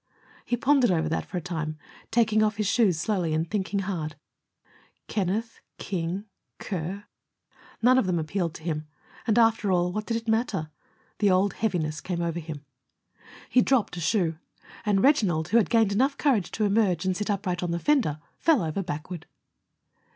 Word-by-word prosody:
He 240 - 0
pondered 265 -1 +4
over 160 -3 +1
that 160 - -2
for 180 - -4
a - - -2
time, 155 -3 -4 0.3
taking 220 -2 +3
off 215 -1 +2
his 210 - 0
shoes 200 -4 +3
slowly 175 -4 0
and 160 +2 0
thinking 200 +1 -1
hard. 165 -6 -3 0.9
"Kenneth, 215 +3 -2 0.2
King, 185 +2 -3 0.3
Kerr 190 +2 -4 0.4
" - - -27
None 255 +2 +6
of 210 - 0
them 180 -2 +1
appealed 165 +1 -2
to - - -10
him. 155 -2 -3 0.4
And, 220 0 +3
after 225 -3 +3
all, 180 -1 +2
what 215 +1 -3
did 230 - 0
it 230 0 -8
matter? 220 -9 0 0.5
The 205 - +4
old 190 +2 +3
heaviness 165 -8 -1
came 180 -2 -3
over 170 0 -2
him. 155 -3 -8 0.8
He 250 - +4
dropped 245 -9 +1
a - - -5
shoe, 165 -2 +1 0.5
and 195 -2 +3
Reginald, 185 - +3
who 225 - +4
had 225 - +3
gained 225 -3 +3
enough 265 +7 +2
courage 250 - +2
to 220 - -1
emerge 200 -5 +2
and 185 -1 +1
sit 210 +3 -3
upright 185 -3 -1
on 180 - -2
the 170 - 0
fender, 235 - +2 0.2
fell 310 - +3
over 160 +4 -2
backward. 170 -1 -6
190 Hz, 180 wpm, -26 LUFS, 170-220 Hz, 0.9 s, None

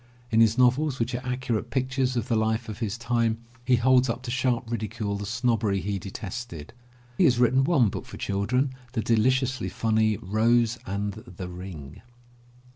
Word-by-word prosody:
In 110 0 +5
his 110 0 +4
novels, 130 +3 +3
which 115 +1 -1
are 125 +1 -3
accurate 125 -3 -2
pictures 130 0 0
of 120 - -1
the 115 - +1
life 110 +1 0
of 110 0 -7
his 110 -1 -2
time, 115 -1 0 0.3
he 125 0 +4
holds 130 +1 +4
up 120 +2 -3
to 120 - -4
sharp 125 -2 0
ridicule 110 -2 -3
the 100 0 -5
snobbery 115 -3 +1
he 100 0 -2
detested. 95 -3 -7 0.5
He 185 - +6
has 125 -6 +4
written 125 +2 +4
one 135 -7 +3
book - - -6
for - - -9
children, 125 +7 0 0.2
the 115 - 0
deliciously 130 +3 +1
funny 110 -1 +1
Rose 115 +4 +2
and 100 +1 -2
the 90 0 -9
Ring. 90 -6 -9
115 Hz, 175 wpm, -26 LUFS, 105-125 Hz, 0.5 s, He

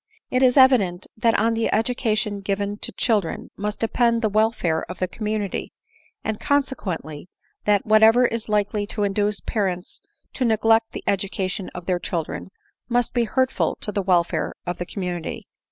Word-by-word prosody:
^It 255 - +2
is 255 +1 +4
evident 215 -9 +5
that 225 0 +2
on 225 +2 +2
the 225 0 0
education 215 -2 0
given 200 +1 -2
to - - -4
children 210 -8 -1
must 210 +1 -4
depend 230 0 +2
the 220 - +3
welfare 210 -6 +1
of 180 - -6
the 185 - -1
community; 210 0 -3 0.5
and, 220 -1 -2
conse 285 -2 +1
quently, 160 - -6 0.4
that 205 -1 +3
whatever 220 +3 +6
is 230 -2 -2
likely 210 0 0
to 210 0 -2
induce 205 0 0
parents 185 -4 -3 0.3
to 260 - -2
ne 225 -3 +3
glect 225 +1 +3
the - - -6
education 195 0 -2
of 180 -1 -7
their 180 -2 0
children 170 +1 -4 0.4
must 245 0 +1
be 240 -2 +1
hvrtful 260 +3 0
to 210 - -2
the 205 - -1
welfare 180 -3 +1
of 175 0 -4
the 175 - -4
community. 180 -4 -4
210 Hz, 170 wpm, -23 LUFS, 190-230 Hz, 0.5 s, whatever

